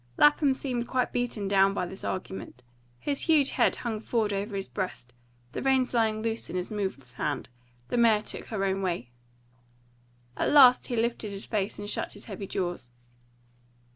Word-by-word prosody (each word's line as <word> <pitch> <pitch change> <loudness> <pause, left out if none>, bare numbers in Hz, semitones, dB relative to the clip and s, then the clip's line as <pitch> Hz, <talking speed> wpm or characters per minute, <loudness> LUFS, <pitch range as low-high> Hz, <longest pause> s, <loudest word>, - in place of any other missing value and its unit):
Lapham 295 -2 +5
seemed 245 -3 -2
quite 255 -1 0
beaten 240 -5 -1
down 195 0 +4
by 180 - 0
this 190 +3 -7
argument. 185 -9 -5 0.3
His 280 - -1
huge 300 -4 +4
head - - +3
hung 225 -3 -3
forward 220 -2 0
over 200 +1 -3
his 195 -1 -2
breast; 180 -10 -5 0.4
the - - -4
reins 265 -2 +2
lay 225 -2 +3
loose 220 +1 -3
in - - -5
his 180 +2 -3
moveless 190 -12 -4
hand; 125 - -3 0.4
the - - -1
mare 225 -3 +4
took - - -5
her 195 -3 -2
own 195 0 0
way. 170 -10 -2 1.2
At - - 0
last 260 -4 +7
he 245 - -2
lifted 230 -1 -1
his 200 0 -6
face 205 -3 -1
and 205 - -6
shut - - -2
his 205 - -9
heavy 200 -2 -6
jaws. 175 -11 -3
210 Hz, 175 wpm, -28 LUFS, 190-240 Hz, 1.2 s, last